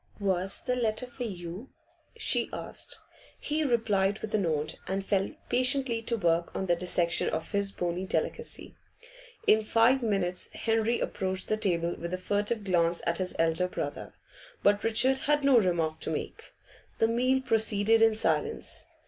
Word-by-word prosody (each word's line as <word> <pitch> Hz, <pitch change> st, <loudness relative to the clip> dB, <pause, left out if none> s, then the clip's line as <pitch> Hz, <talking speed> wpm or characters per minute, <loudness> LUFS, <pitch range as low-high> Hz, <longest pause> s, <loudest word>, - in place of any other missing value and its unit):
'Was 190 Hz, -1 st, 0 dB
the 250 Hz, -, -1 dB
letter 230 Hz, 0 st, -1 dB
for 245 Hz, 0 st, -6 dB
you?' 185 Hz, +3 st, -7 dB, 0.5 s
she 445 Hz, -, +2 dB
asked. -, -, -5 dB, 0.4 s
He 305 Hz, +1 st, -1 dB
replied 210 Hz, -6 st, +1 dB
with 220 Hz, 0 st, -7 dB
a 215 Hz, -, +3 dB
nod, 155 Hz, -4 st, -1 dB
and 195 Hz, +1 st, -2 dB
fell 195 Hz, -1 st, +1 dB, 0.2 s
patiently 255 Hz, -2 st, +1 dB
to 230 Hz, +1 st, -2 dB
work 170 Hz, -3 st, +1 dB
on 190 Hz, -, -2 dB
the 175 Hz, -2 st, +2 dB
dissection 170 Hz, -1 st, 0 dB
of 160 Hz, -, -4 dB
his 200 Hz, -1 st, +1 dB
bony 180 Hz, 0 st, -3 dB
delicacy. -, -, -3 dB, 0.7 s
In 220 Hz, 0 st, +5 dB
five 230 Hz, +5 st, +3 dB
minutes 195 Hz, -5 st, 0 dB
Henry 225 Hz, +1 st, 0 dB
approached 190 Hz, -1 st, -3 dB
the 215 Hz, -, +3 dB
table 175 Hz, -5 st, 0 dB
with 170 Hz, +2 st, -3 dB
a -, -, -5 dB
furtive 205 Hz, +4 st, -1 dB
glance 175 Hz, -3 st, +1 dB
at 170 Hz, +1 st, +1 dB
his 185 Hz, -1 st, -3 dB
elder 165 Hz, +2 st, +2 dB
brother. -, -, -5 dB, 0.5 s
But 205 Hz, +1 st, +3 dB
Richard 255 Hz, +4 st, +3 dB
had 295 Hz, -1 st, +3 dB
no 275 Hz, -3 st, +6 dB
remark 165 Hz, -5 st, 0 dB
to -, -, -2 dB
make. -, -, -5 dB, 0.4 s
The 225 Hz, -, +3 dB
meal 255 Hz, +3 st, +2 dB
proceeded 225 Hz, -3 st, +2 dB
in 225 Hz, -1 st, +5 dB
silence. 220 Hz, -, -1 dB
205 Hz, 160 wpm, -29 LUFS, 180-230 Hz, 0.7 s, no